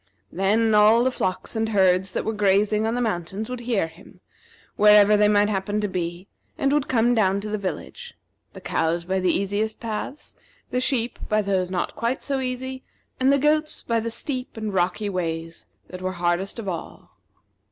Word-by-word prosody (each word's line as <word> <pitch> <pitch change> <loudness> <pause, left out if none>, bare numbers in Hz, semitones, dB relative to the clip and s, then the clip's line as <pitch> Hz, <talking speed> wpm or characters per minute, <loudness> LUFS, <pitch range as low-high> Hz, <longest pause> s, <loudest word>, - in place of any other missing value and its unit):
Then 215 +4 +2
all 215 +3 +6
the 260 - +2
flocks 185 -1 -3
and 220 0 0
herds 190 -2 +3
that - - -2
were 220 - -1
grazing 210 +1 +2
on 225 - -1
the 245 - -1
mountains 210 +1 -3
would 250 - -4
hear 235 -6 0
him, 165 +4 -15 0.6
wherever 210 0 +6
they 210 0 +4
might 205 0 +4
happen 205 0 -1
to 210 - 0
be, 175 0 -4 0.3
and 275 +1 +1
would 295 -1 +1
come 240 0 +2
down 200 -4 +2
to 210 - -5
the 215 - -1
village 480 - -6 0.4
the - - -11
cows 170 +1 -1
by 190 +1 0
the 185 -1 +1
easiest 205 +4 -1
paths, 230 +6 -6 0.4
the 250 - 0
sheep 245 -3 0
by 215 0 +2
those 190 -2 0
not 185 -1 -2
quite 235 +4 -2
so 275 -1 -1
easy, 260 0 -4 0.4
and 260 +1 +4
the 280 - +4
goats 305 +2 +1
by 230 -1 0
the 230 +1 -3
steep 250 +1 -4
and 215 -2 -4
rocky 185 +3 0
ways 165 -3 -4 0.2
that 185 0 -8
were 185 0 -2
hardest 175 +3 -1
of 225 -3 -6
all. 170 -3 -6
210 Hz, 190 wpm, -24 LUFS, 185-235 Hz, 0.6 s, all